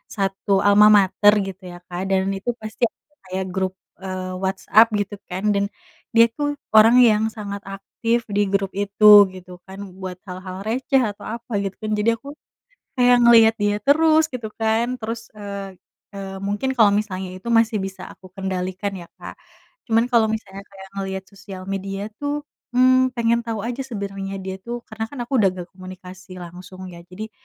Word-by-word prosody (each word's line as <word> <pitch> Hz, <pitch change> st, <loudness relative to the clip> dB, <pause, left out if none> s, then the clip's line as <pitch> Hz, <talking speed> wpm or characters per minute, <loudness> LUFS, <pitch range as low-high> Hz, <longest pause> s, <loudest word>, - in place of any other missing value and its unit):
satu 195 Hz, -1 st, -2 dB, 0.2 s
almamater 205 Hz, 0 st, +6 dB
gitu 190 Hz, -1 st, -8 dB
ya 175 Hz, -, -10 dB
Kak 175 Hz, 0 st, -5 dB
dan 190 Hz, -1 st, +2 dB
itu 225 Hz, +5 st, -4 dB
pasti 215 Hz, +2 st, -7 dB
ada 300 Hz, -, -58 dB, 0.2 s
kayak 190 Hz, +1 st, -2 dB
grup, 190 Hz, -1 st, -1 dB, 0.3 s
eee, 185 Hz, -1 st, -5 dB
WhatsApp 200 Hz, +4 st, +4 dB
gitu 205 Hz, +1 st, -3 dB
kan 185 Hz, +3 st, -5 dB
dan 200 Hz, 0 st, +1 dB, 0.5 s
dia 230 Hz, 0 st, +8 dB
tuh 290 Hz, -1 st, -1 dB, 0.3 s
orang 220 Hz, +2 st, +8 dB
yang 215 Hz, 0 st, +2 dB
sangat 200 Hz, -2 st, -6 dB
aktif 230 Hz, +4 st, -1 dB, 0.2 s
di 205 Hz, -, +3 dB
grup 195 Hz, -1 st, +1 dB
itu, 205 Hz, +1 st, 0 dB, 0.3 s
gitu 185 Hz, 0 st, -12 dB
kan, 190 Hz, 0 st, -11 dB, 0.2 s
buat 185 Hz, -1 st, -6 dB
hal-hal 185 Hz, 0 st, -7 dB
receh 260 Hz, +3 st, +1 dB
atau 205 Hz, -, -13 dB
apa 235 Hz, +1 st, -9 dB
gitu 195 Hz, -1 st, -3 dB
kan 215 Hz, -, -3 dB
jadi 210 Hz, +2 st, +2 dB
aku 245 Hz, -, -16 dB, 0.7 s
kayak 245 Hz, -1 st, +5 dB
ngeliat 225 Hz, -1 st, +7 dB
dia 205 Hz, 0 st, +2 dB
terus 315 Hz, +3 st, +4 dB
gitu 235 Hz, -3 st, -4 dB
kan 220 Hz, +1 st, +2 dB
terus, 230 Hz, +1 st, -5 dB
eee, 200 Hz, -2 st, -7 dB, 0.4 s
eee, 195 Hz, -1 st, -6 dB
mungkin 205 Hz, +6 st, -1 dB
kalau 215 Hz, -3 st, +6 dB
misalnya 190 Hz, -3 st, -5 dB
itu 185 Hz, +5 st, -11 dB
masih 225 Hz, -1 st, +3 dB
bisa 190 Hz, -1 st, -7 dB
aku 185 Hz, -, -15 dB
kendalikan 190 Hz, +1 st, -3 dB
ya 175 Hz, -2 st, -9 dB
Kak, -, -, -9 dB, 0.5 s
cuman 230 Hz, +2 st, +2 dB
kalau 230 Hz, -2 st, +4 dB
misalnya 200 Hz, -3 st, -7 dB
kayak 195 Hz, -1 st, -12 dB
ngeliat 190 Hz, -1 st, -4 dB
sosial 195 Hz, -2 st, -10 dB
media 195 Hz, +1 st, -4 dB
tuh, 290 Hz, +1 st, -2 dB, 0.3 s
mmm, 255 Hz, +1 st, +4 dB
pengen 235 Hz, 0 st, +2 dB
tau 225 Hz, -3 st, -3 dB
aja 240 Hz, +4 st, -4 dB
sebenernya 195 Hz, -4 st, -5 dB
dia 190 Hz, 0 st, -5 dB
tuh 240 Hz, 0 st, -5 dB
karena 220 Hz, 0 st, -4 dB
kan 285 Hz, -, -9 dB
aku 240 Hz, -, -8 dB
udah 195 Hz, -3 st, +4 dB
nggak 180 Hz, -1 st, -8 dB
komunikasi 185 Hz, 0 st, -11 dB
langsung 180 Hz, +2 st, -11 dB
ya 170 Hz, -, -11 dB
jadi 205 Hz, +5 st, -8 dB
200 Hz, 175 wpm, -22 LUFS, 190-230 Hz, 0.7 s, dia